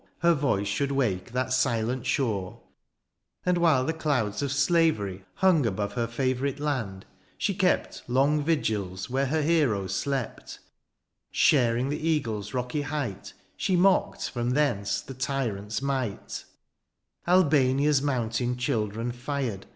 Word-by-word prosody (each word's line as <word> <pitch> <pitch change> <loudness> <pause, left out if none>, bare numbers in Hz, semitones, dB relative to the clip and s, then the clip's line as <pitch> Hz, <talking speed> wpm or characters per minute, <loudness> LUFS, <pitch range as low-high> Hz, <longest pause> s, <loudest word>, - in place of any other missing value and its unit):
15 - - -42
Her 170 -1 +5
voice 135 -10 0
should 140 +7 -1
wake 115 -8 -1
that 130 +1 -1
silent 125 -1 0
shore: 105 -10 -1 0.9
And 180 -1 +2
while 155 -7 +3
the 160 - 0
clouds 140 -10 -1
of 140 -2 -1
slavery 140 - +1
hung 185 -6 +4
Above 100 0 -2
her 120 -1 -1
favourite 130 +3 -1
land, 115 -11 -3 0.3
she - - 0
kept - - 0
Long 140 +4 +2
vigils 110 - -1
where 135 +1 +1
her 155 +3 0
heroes 125 - +1
slept; 135 0 -3 0.7
Sharing 125 -2 +3
the 150 - -2
eagles 110 -10 -1
rocky 125 +3 -2
height, 140 -9 -4 0.2
She 190 -2 0
mocked 185 +2 +2
from 120 -1 -2
thence 105 -8 +1
the 135 - -9
tyrant's 125 -5 -2
might; 130 -6 -3 0.8
Albania's 145 -5 +4
mountain 125 -3 -1
children 115 -1 -1
fired. 125 -5 -4
130 Hz, 130 wpm, -27 LUFS, 110-145 Hz, 0.9 s, Her